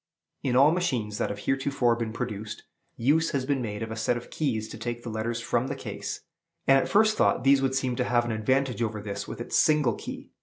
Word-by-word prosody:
In 125 Hz, -2 st, 0 dB
all 140 Hz, +4 st, +7 dB
machines 125 Hz, -, -1 dB
that -, -, 0 dB
have 100 Hz, -, -4 dB
heretofore 135 Hz, 0 st, +1 dB
been 115 Hz, -1 st, -3 dB
produced, 110 Hz, -2 st, -5 dB, 0.3 s
use 150 Hz, +7 st, +3 dB
has 135 Hz, -2 st, 0 dB
been 140 Hz, -1 st, 0 dB
made 105 Hz, -2 st, -4 dB
of 110 Hz, -, -6 dB
a -, -, -3 dB
set 115 Hz, +2 st, 0 dB
of 120 Hz, -, -10 dB
keys 115 Hz, -8 st, -1 dB
to -, -, -8 dB
take 120 Hz, 0 st, -4 dB
the 120 Hz, -, -5 dB
letters 110 Hz, +2 st, -2 dB
from 120 Hz, +2 st, 0 dB
the -, -, -3 dB
case; -, -, -6 dB, 0.4 s
and 135 Hz, 0 st, +6 dB
at -, -, -2 dB
first 215 Hz, +1 st, +4 dB
thought 125 Hz, -, +2 dB
these 135 Hz, 0 st, +5 dB
would 135 Hz, -1 st, +1 dB
seem 130 Hz, -2 st, 0 dB
to 125 Hz, -, +2 dB
have 120 Hz, -1 st, +2 dB
an 120 Hz, -, -2 dB
advantage 125 Hz, +3 st, 0 dB
over 110 Hz, -2 st, -1 dB
this 100 Hz, -1 st, -5 dB
with -, -, -7 dB
its -, -, -4 dB
single 150 Hz, -6 st, +4 dB
key. -, -, -8 dB
120 Hz, 235 wpm, -27 LUFS, 110-135 Hz, 0.4 s, all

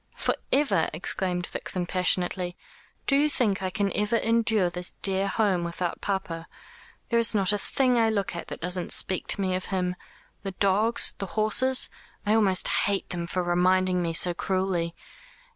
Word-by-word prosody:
"For -, -, 0 dB, 0.2 s
ever!" 260 Hz, -, +2 dB
exclaimed 180 Hz, +2 st, -1 dB
Vixen 180 Hz, 0 st, -3 dB
passionately. 180 Hz, 0 st, 0 dB, 0.5 s
"Do 275 Hz, -, +3 dB
you 295 Hz, +2 st, +3 dB
think 210 Hz, -9 st, 0 dB
I 185 Hz, -, -1 dB
can 195 Hz, +1 st, -1 dB
ever 210 Hz, +2 st, 0 dB
endure 225 Hz, -5 st, +1 dB
this 180 Hz, 0 st, -5 dB
dear 195 Hz, 0 st, +1 dB
home 195 Hz, -4 st, +1 dB
without 170 Hz, 0 st, -4 dB
papa? 180 Hz, -4 st, -3 dB, 0.6 s
There 235 Hz, -, +2 dB
is 230 Hz, -1 st, +2 dB
not 195 Hz, -1 st, +3 dB
a 205 Hz, -, 0 dB
thing 250 Hz, +2 st, +1 dB
I 225 Hz, -1 st, +3 dB
look 200 Hz, -5 st, -2 dB
at 170 Hz, -, -6 dB
that -, -, -8 dB
doesn't 180 Hz, +1 st, -3 dB
speak 185 Hz, -, 0 dB
to 200 Hz, -, +1 dB
me 185 Hz, -1 st, 0 dB
of 185 Hz, 0 st, -3 dB
him. 180 Hz, -2 st, -2 dB, 0.5 s
The 195 Hz, -1 st, -5 dB
dogs, 200 Hz, +5 st, +3 dB
the 195 Hz, -, -4 dB
horses. 255 Hz, +5 st, +3 dB, 0.4 s
I 210 Hz, -, +2 dB
almost 200 Hz, -4 st, +4 dB
hate 200 Hz, -1 st, 0 dB
them 170 Hz, -1 st, -4 dB
for 180 Hz, +1 st, -1 dB
reminding 180 Hz, +1 st, +2 dB
me 165 Hz, -1 st, -2 dB
so 175 Hz, +2 st, +4 dB
cruelly. 185 Hz, -2 st, -1 dB
190 Hz, 175 wpm, -26 LUFS, 180-210 Hz, 0.6 s, almost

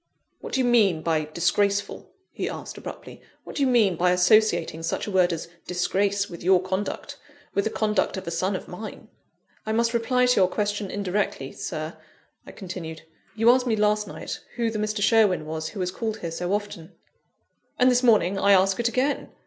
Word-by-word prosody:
"What -, -, -9 dB
do 265 Hz, -, +1 dB
you 255 Hz, -, +2 dB
mean 205 Hz, -9 st, +3 dB
by 160 Hz, -2 st, +1 dB
'disgraceful?'" 200 Hz, +6 st, 0 dB, 0.2 s
he -, -, -3 dB
asked -, -, -7 dB
abruptly; -, -, -9 dB, 0.2 s
"what -, -, -10 dB
do -, -, -1 dB
you 275 Hz, -, +4 dB
mean 225 Hz, -7 st, +3 dB
by 180 Hz, +2 st, +2 dB
associating 180 Hz, -3 st, +3 dB
such 165 Hz, -, -2 dB
a 210 Hz, -, -5 dB
word 185 Hz, -2 st, +3 dB
as 165 Hz, -1 st, -4 dB, 0.2 s
disgrace 200 Hz, +3 st, 0 dB
with 170 Hz, -1 st, -10 dB
your 185 Hz, +1 st, +5 dB
conduct 190 Hz, +2 st, -4 dB, 0.3 s
with 200 Hz, -, 0 dB
the -, -, +1 dB
conduct 210 Hz, -3 st, 0 dB
of 190 Hz, -, -6 dB
a 170 Hz, -, -4 dB
son 185 Hz, +4 st, -1 dB
of -, -, -6 dB
mine?" 210 Hz, +4 st, -9 dB, 0.5 s
"I 220 Hz, -, -2 dB
must 230 Hz, +1 st, +1 dB
reply 250 Hz, +2 st, +2 dB
to 250 Hz, 0 st, +3 dB
your 185 Hz, -, +4 dB
question 205 Hz, +1 st, -2 dB
indirectly, 195 Hz, -9 st, -2 dB
Sir," 155 Hz, 0 st, -5 dB, 0.5 s
I -, -, -8 dB
continued. 175 Hz, -5 st, -7 dB, 0.3 s
"You 225 Hz, +2 st, +5 dB
asked 255 Hz, 0 st, +2 dB
me 225 Hz, -, +2 dB
last 210 Hz, 0 st, +1 dB
night -, -, -6 dB, 0.2 s
who 235 Hz, -2 st, 0 dB
the 215 Hz, -, -3 dB
Mr. 215 Hz, -1 st, -1 dB
Sherwin 210 Hz, -7 st, +3 dB
was 160 Hz, 0 st, -4 dB
who 210 Hz, -, -9 dB
has 180 Hz, 0 st, -1 dB
called 220 Hz, +2 st, -4 dB
here 170 Hz, -, -4 dB
so 175 Hz, +2 st, -3 dB
often 205 Hz, -4 st, -4 dB, 0.4 s
" -, -, -47 dB
"And 255 Hz, +1 st, +5 dB
this 250 Hz, 0 st, +3 dB
morning 205 Hz, -6 st, +3 dB
I 200 Hz, +1 st, +5 dB
ask 190 Hz, +1 st, +3 dB
it 235 Hz, 0 st, +2 dB
again. 260 Hz, +5 st, -1 dB
200 Hz, 200 wpm, -25 LUFS, 180-220 Hz, 0.5 s, your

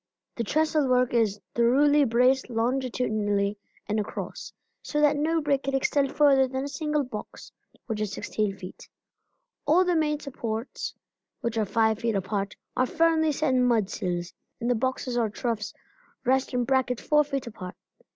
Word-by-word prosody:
The 235 Hz, -, -2 dB
trestle 305 Hz, +3 st, +1 dB
work 250 Hz, -1 st, +2 dB
is 215 Hz, -3 st, +2 dB
thoroughly 280 Hz, +5 st, +4 dB
braced 250 Hz, +2 st, +3 dB
longitudinally 225 Hz, -4 st, 0 dB, 0.3 s
and 215 Hz, +1 st, 0 dB
across, 210 Hz, +1 st, -5 dB, 0.3 s
so 295 Hz, -, -2 dB
that 295 Hz, 0 st, +4 dB
no 320 Hz, +3 st, +1 dB
break 285 Hz, -2 st, +1 dB
can 275 Hz, 0 st, -2 dB
extend 275 Hz, 0 st, +1 dB
further 275 Hz, -3 st, +4 dB
than 260 Hz, +1 st, -3 dB
a -, -, -3 dB
single 300 Hz, 0 st, -1 dB
box, 235 Hz, -5 st, -8 dB, 0.3 s
which 220 Hz, -3 st, -3 dB
is 210 Hz, -2 st, -2 dB
16 205 Hz, -2 st, -2 dB
feet. 185 Hz, -1 st, -10 dB, 0.8 s
All 350 Hz, +5 st, +5 dB
the 355 Hz, -1 st, +2 dB
main 300 Hz, -2 st, +1 dB
supports, 235 Hz, -4 st, -5 dB, 0.5 s
which 235 Hz, -1 st, -2 dB
are 220 Hz, -1 st, +1 dB
five 220 Hz, +1 st, +2 dB
feet 230 Hz, -2 st, 0 dB
apart, 195 Hz, +1 st, -2 dB, 0.2 s
are 255 Hz, -, +2 dB
firmly 320 Hz, 0 st, +3 dB
set 295 Hz, -2 st, 0 dB
in 255 Hz, -, +3 dB
mudsills, 185 Hz, -7 st, 0 dB, 0.3 s
and 240 Hz, 0 st, 0 dB
the -, -, +5 dB
boxes 250 Hz, +1 st, -1 dB
or 225 Hz, -2 st, +1 dB
troughs 215 Hz, -1 st, -3 dB, 0.5 s
rest 265 Hz, +1 st, +2 dB
in 250 Hz, -1 st, +1 dB
brackets 260 Hz, -1 st, 0 dB
four 300 Hz, 0 st, +4 dB
feet 275 Hz, -3 st, -3 dB
apart. 185 Hz, -6 st, -8 dB
250 Hz, 160 wpm, -27 LUFS, 220-285 Hz, 0.8 s, All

